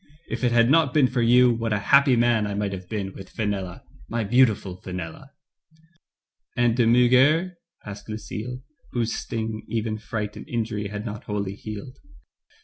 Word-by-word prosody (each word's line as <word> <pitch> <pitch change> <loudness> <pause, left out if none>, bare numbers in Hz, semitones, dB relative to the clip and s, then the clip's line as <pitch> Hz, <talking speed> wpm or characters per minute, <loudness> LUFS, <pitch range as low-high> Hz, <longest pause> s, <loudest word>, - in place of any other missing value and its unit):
If - - -3
it 125 - +3
had 115 -1 +4
not 150 -4 +3
been 145 -3 +6
for 125 0 0
you, 125 +1 +5
what 115 -1 -2
a - - +2
happy 140 +5 +4
man 120 -2 +2
I 100 - -3
might 100 -1 -1
have 90 -1 -8
been 100 -3 -3
with 95 - -10
Fenella 100 -5 -3
— - - -22
my 115 0 -1
beautiful 105 -5 +2
Fenella," 90 +7 -7 1.3
"And 120 -1 +3
De 120 -2 +3
Murger?" 130 +9 +4 0.3
asked 105 +1 -9
Lucille, 110 +3 -6 0.3
whose 115 -2 0
sting 110 -1 -4
even 110 -1 -2
fright 105 -1 -4
and - - -10
injury 110 -3 -2
had 105 +1 -6
not 105 -1 -6
wholly 100 -2 -3
killed. 110 +5 -8
115 Hz, 170 wpm, -24 LUFS, 105-125 Hz, 1.3 s, been